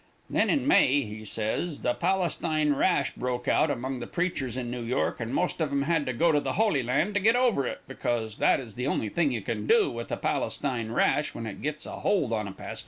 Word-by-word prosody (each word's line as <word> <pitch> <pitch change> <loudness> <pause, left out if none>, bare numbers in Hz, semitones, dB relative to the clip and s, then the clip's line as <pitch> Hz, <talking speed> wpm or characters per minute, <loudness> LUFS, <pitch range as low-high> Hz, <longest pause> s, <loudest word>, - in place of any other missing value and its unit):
Then - - +2
in 280 -3 +1
May, 145 - +5
he 110 -1 -8
says, 110 +10 -3
the 120 - +2
Palestine 170 -4 +1
rash 140 -1 +1
broke 125 -1 -3
out 155 - +3
among 130 -1 -3
the 120 - -6
preachers 145 -9 -2
in 120 -2 -3
New 125 0 -4
York, 120 +3 -1
and 115 0 -4
most 175 +4 -1
of 155 -3 0
'em 140 0 +1
had 155 -2 0
to - - +1
go 165 +8 +3
to 150 - +3
the - - -2
Holy 210 -11 +2
Land 140 - 0
to 205 - +2
get 220 +4 +4
over 240 - +2
it, - - -5
because 110 -3 -2
that - - +3
is 120 -5 -9
the 125 +5 -3
only 110 -6 0
thing 155 +3 +1
you 115 -3 -2
can 105 +1 -4
do - - +4
with 115 0 -5
the - - -3
Palestine 120 -5 -2
rash 150 +5 +1
when 115 - -5
it 110 - -7
gets 150 +1 -3
a - - -7
hold 150 - +1
on 105 -2 -1
a - - -5
pastor. - - -7
135 Hz, 240 wpm, -27 LUFS, 120-165 Hz, -, May